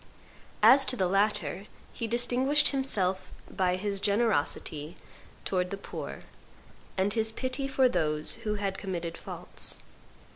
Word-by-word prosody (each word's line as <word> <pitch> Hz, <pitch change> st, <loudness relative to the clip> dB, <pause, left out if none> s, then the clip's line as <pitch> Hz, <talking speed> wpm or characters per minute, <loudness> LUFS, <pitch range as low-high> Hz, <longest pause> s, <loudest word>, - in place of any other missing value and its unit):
As 270 Hz, +1 st, +9 dB
to 255 Hz, -, +1 dB
the 190 Hz, -6 st, +1 dB
latter, 205 Hz, +1 st, 0 dB, 0.3 s
he 230 Hz, -, -3 dB
distinguished 255 Hz, +5 st, +3 dB
himself 195 Hz, -9 st, 0 dB, 0.2 s
by 180 Hz, -1 st, 0 dB
his 200 Hz, +1 st, -3 dB
generosity 185 Hz, -7 st, 0 dB, 0.5 s
towards 180 Hz, -1 st, 0 dB
the 200 Hz, -, -4 dB
poor, 195 Hz, -, -7 dB, 0.8 s
and 195 Hz, +2 st, +1 dB
his 220 Hz, -1 st, +1 dB
pity 260 Hz, +4 st, -3 dB
for 265 Hz, -1 st, +3 dB
those 150 Hz, -9 st, +1 dB
who 210 Hz, -2 st, -1 dB
had 200 Hz, -2 st, -3 dB
committed 170 Hz, -4 st, -4 dB
faults. -, -, -4 dB
205 Hz, 130 wpm, -29 LUFS, 185-240 Hz, 0.8 s, As